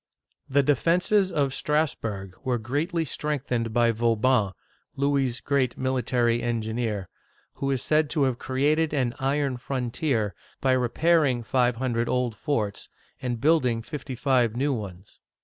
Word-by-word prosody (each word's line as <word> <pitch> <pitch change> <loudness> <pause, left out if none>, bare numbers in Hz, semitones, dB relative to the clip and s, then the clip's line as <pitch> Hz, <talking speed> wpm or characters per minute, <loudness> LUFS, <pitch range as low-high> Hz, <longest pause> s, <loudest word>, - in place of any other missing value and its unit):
The 140 +1 +3
defenses 180 +7 +2
of 140 -3 0
Strassburg 115 - -1
were 130 -3 0
greatly 150 - -1
strengthened 125 -6 -2
by 120 +1 +3
Vauban - - -7
(vo 115 0 +2
baN'), 110 -3 +2 0.2
— - - -43
Louis's 135 -3 0
great 135 -3 0
military 125 -2 +1
engineer, 110 -4 -2 0.2
— - - -38
who 135 - 0
is 135 -3 -1
said 155 -1 +2
to 150 -2 +1
have 130 -3 0
created 150 +4 +1
an 125 -4 0
iron 135 -1 0
frontier 125 - -1
" - - -31
by 130 - +2
repair 155 +7 +3
ing. 125 -4 0
five 125 0 +2
hundred 120 -1 -1
old 125 -3 0
forts 110 -5 -2 0.3
and 120 -2 -2
building 125 -5 +2
fifty 135 -1 -6
five 125 -3 +2
new 140 +3 +1
ones. 100 -5 -8
130 Hz, 155 wpm, -26 LUFS, 115-145 Hz, 0.3 s, The